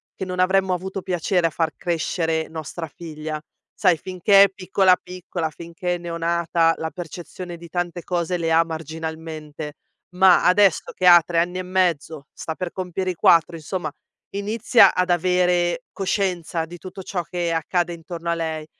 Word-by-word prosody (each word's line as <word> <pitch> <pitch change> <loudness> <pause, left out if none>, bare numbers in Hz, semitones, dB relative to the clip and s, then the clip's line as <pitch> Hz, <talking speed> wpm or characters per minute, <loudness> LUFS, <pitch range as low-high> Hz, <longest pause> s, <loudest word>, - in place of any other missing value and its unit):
che 190 - -4
non 185 0 -5
avremmo 190 0 +3
avuto 190 +1 -4
piacere 180 -1 0
a - - +3
far 160 0 0
crescere 165 -1 -1
nostra 160 +1 -6
figlia. 155 -1 -6 0.4
Sai, 185 -4 +5
finché 185 +3 +4
è - - -2
piccola, 190 0 +3
piccola, 180 -3 -5
finché 170 +2 -4
è - - -4
neonata, 170 -1 +1
la 160 - -3
percezione 175 +1 -8
di 170 0 -11
tante 175 0 -3
cose 175 0 -1
le 165 -1 -1
ha 165 +1 +5
marginalmente, 160 -1 -6 0.4
ma 185 -1 +6
adesso 195 0 +4
che 185 - -2
ha 175 -1 +9
3 170 0 -3
anni 175 +2 +1
e - - -1
mezzo, 175 -5 -1
sta 160 - -5
per 180 0 -4
compiere 185 0 -3
i - - -4
4, 170 0 +4
insomma 160 0 -4 0.4
inizia 205 +1 +4
ad 180 0 +1
avere 180 +3 +2
coscienza 185 -4 -1
di 175 +2 -11
tutto 185 +3 -9
ciò 180 -1 -3
che 175 0 -3
accade 175 +2 0
intorno 170 0 -5
a - - +2
lei. 160 -2 -3
175 Hz, 165 wpm, -22 LUFS, 165-185 Hz, 0.4 s, ha